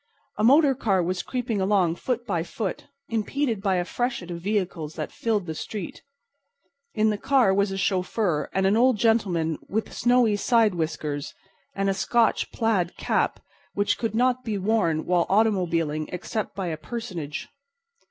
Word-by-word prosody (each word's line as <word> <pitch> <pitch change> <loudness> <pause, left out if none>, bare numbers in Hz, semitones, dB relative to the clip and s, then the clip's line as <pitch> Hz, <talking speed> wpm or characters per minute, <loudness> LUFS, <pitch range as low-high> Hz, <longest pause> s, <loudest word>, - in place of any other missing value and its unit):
A - - +1
motor 280 +4 +6
car 200 -8 +1
was 180 +1 -1
creeping 245 -5 -2
along 190 -4 +2
foot 240 +6 -3
by 175 -7 -1
foot, 190 +3 -4 0.2
impeded 230 0 -1
by 195 -2 +1
a 175 -1 0
freshet 240 -6 -3
of 170 0 -6
vehicles 180 -6 -2
that - - -4
filled 215 -5 -1
the 160 - -4
street. 190 +3 -6 0.9
In 215 0 +3
the 210 - -3
car 255 -7 +3
was 200 +1 +2
a 195 - -3
chauffeur 185 -4 0
and 190 0 +1
an 195 +2 +3
old 245 0 +4
gentleman 190 -9 +1
with 220 +2 -2
snowy 240 -3 +3
side 225 -1 +3
whiskers 155 -3 -3 0.4
and 195 0 0
a 195 - +2
Scotch 220 +4 +1
plaid 205 -7 0
cap - - 0 0.3
which 205 0 +1
could 225 -2 -2
not 250 +1 +2
be 220 -4 -2
worn 190 -6 +1
while 175 -1 +2
automobiling 170 -7 +1
except 215 +5 -4
by 195 - -3
a 160 - -3
personage. 175 -8 -6
200 Hz, 160 wpm, -25 LUFS, 175-225 Hz, 0.9 s, motor